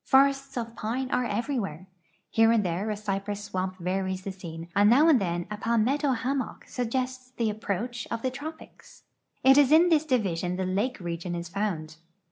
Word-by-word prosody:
Forests 275 Hz, 0 st, +3 dB
of 230 Hz, -1 st, -4 dB
pine 250 Hz, +5 st, -3 dB
are 250 Hz, -, +1 dB
every 240 Hz, +5 st, -1 dB
where. 185 Hz, -4 st, -5 dB, 0.5 s
Here 225 Hz, 0 st, +5 dB
and 225 Hz, -3 st, +3 dB
there 180 Hz, +5 st, -1 dB
a 210 Hz, -, -2 dB
cypress 205 Hz, 0 st, -3 dB
swamp 185 Hz, -2 st, -3 dB
varies 190 Hz, +1 st, -2 dB
the 195 Hz, -, -4 dB
scene, 170 Hz, -3 st, -8 dB
and 205 Hz, +1 st, +6 dB
now 280 Hz, +7 st, +6 dB
and 285 Hz, -9 st, +5 dB
then 175 Hz, -2 st, -1 dB
a 210 Hz, -, -3 dB
palmetto 235 Hz, +7 st, +1 dB
liammock 260 Hz, +3 st, -3 dB
suggests 255 Hz, +1 st, -3 dB
the 225 Hz, -2 st, +1 dB
approach 220 Hz, +3 st, -3 dB
of 230 Hz, 0 st, -4 dB
the 260 Hz, -, 0 dB
tropics. 310 Hz, +4 st, -10 dB, 0.4 s
It 270 Hz, +2 st, +7 dB
is 285 Hz, -1 st, +5 dB
in 335 Hz, +3 st, +7 dB
this 315 Hz, -2 st, +3 dB
division 185 Hz, -, 0 dB
the 190 Hz, 0 st, -2 dB
lake 205 Hz, +8 st, -1 dB
region 175 Hz, 0 st, -4 dB
is 170 Hz, -1 st, -5 dB
found. 175 Hz, -6 st, -3 dB
215 Hz, 185 wpm, -27 LUFS, 185-255 Hz, 0.5 s, It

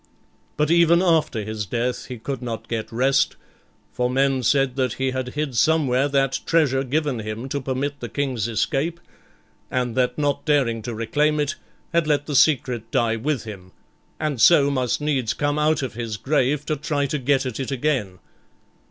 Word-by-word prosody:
But 150 Hz, +1 st, +1 dB
even 170 Hz, 0 st, +5 dB
after 160 Hz, -, +2 dB
his 105 Hz, -1 st, -4 dB
death 125 Hz, +3 st, -2 dB
he 125 Hz, -, -6 dB
could 135 Hz, +4 st, -5 dB
not 115 Hz, -3 st, -5 dB
get 115 Hz, -2 st, -4 dB
rest; 130 Hz, +4 st, +2 dB, 0.6 s
for 125 Hz, 0 st, 0 dB
men 135 Hz, 0 st, +1 dB
said 135 Hz, +1 st, +2 dB
that 130 Hz, -4 st, 0 dB
he 130 Hz, 0 st, -1 dB
had 130 Hz, 0 st, -4 dB
hid 150 Hz, -4 st, -2 dB
somewhere 140 Hz, -2 st, +3 dB
that 135 Hz, -2 st, +1 dB
treasure 140 Hz, -5 st, +2 dB
given 145 Hz, -1 st, -1 dB
him 110 Hz, +3 st, -5 dB
to 140 Hz, +1 st, -2 dB
permit 135 Hz, +2 st, -3 dB
the 120 Hz, -, -6 dB
King's 130 Hz, -6 st, -2 dB
escape, 135 Hz, -, -1 dB, 0.7 s
and 125 Hz, -2 st, -1 dB
that 125 Hz, -1 st, +1 dB
not 145 Hz, -1 st, 0 dB
daring 135 Hz, -7 st, +1 dB
to 115 Hz, +1 st, -5 dB
reclaim 150 Hz, +7 st, +1 dB
it, 145 Hz, -1 st, 0 dB, 0.4 s
had 170 Hz, -2 st, +2 dB
let 145 Hz, -1 st, +1 dB
the 145 Hz, -, -4 dB
secret 125 Hz, -5 st, +2 dB
die 115 Hz, -1 st, +1 dB
with 135 Hz, +4 st, -2 dB
him, 95 Hz, -5 st, -10 dB, 0.5 s
and 150 Hz, -6 st, -2 dB
so 145 Hz, -5 st, +6 dB
must 130 Hz, 0 st, 0 dB
needs 135 Hz, -6 st, 0 dB
come 145 Hz, 0 st, 0 dB
out 150 Hz, -1 st, +2 dB
of 130 Hz, -, -4 dB
his 115 Hz, -2 st, -4 dB
grave 140 Hz, +2 st, 0 dB
to 155 Hz, -1 st, -1 dB
try 145 Hz, 0 st, -1 dB
to 145 Hz, +2 st, -2 dB
get 135 Hz, +1 st, +1 dB
at 125 Hz, -2 st, -4 dB
it 135 Hz, -, -3 dB
again. 130 Hz, -9 st, -1 dB
135 Hz, 180 wpm, -23 LUFS, 120-150 Hz, 0.7 s, so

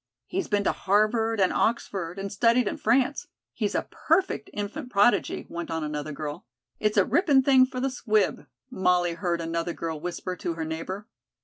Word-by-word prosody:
"He's 380 Hz, +1 st, -3 dB
been 205 Hz, -1 st, +1 dB
to -, -, +2 dB
Harvard 215 Hz, +3 st, +1 dB
and 190 Hz, -, +3 dB
Oxford, 195 Hz, -6 st, -1 dB
and 195 Hz, 0 st, -4 dB
studied 230 Hz, +3 st, +3 dB
in -, -, -2 dB
France. 255 Hz, +5 st, +1 dB, 0.3 s
He's -, -, -2 dB
a -, -, -1 dB
perfect 330 Hz, -, 0 dB
infant 220 Hz, +7 st, -5 dB
prodigy," 205 Hz, +4 st, +2 dB
went 170 Hz, 0 st, -6 dB
on 160 Hz, -1 st, -2 dB
another 150 Hz, 0 st, -4 dB
girl. 145 Hz, -2 st, -6 dB, 0.3 s
"It's 210 Hz, 0 st, 0 dB
a 195 Hz, -, +5 dB
ripping 290 Hz, -7 st, +3 dB
thing 260 Hz, -1 st, +6 dB
for 255 Hz, -1 st, -5 dB
the 270 Hz, +1 st, 0 dB
'Squib,'" 215 Hz, -, 0 dB, 0.2 s
Molly 180 Hz, -2 st, +2 dB
heard 170 Hz, 0 st, -1 dB
another 165 Hz, +1 st, -2 dB
girl 160 Hz, -2 st, -4 dB
whisper 180 Hz, +2 st, -4 dB
to 170 Hz, -1 st, -4 dB
her 160 Hz, -1 st, -3 dB
neighbor. 175 Hz, +6 st, -5 dB
200 Hz, 180 wpm, -26 LUFS, 170-240 Hz, 0.3 s, thing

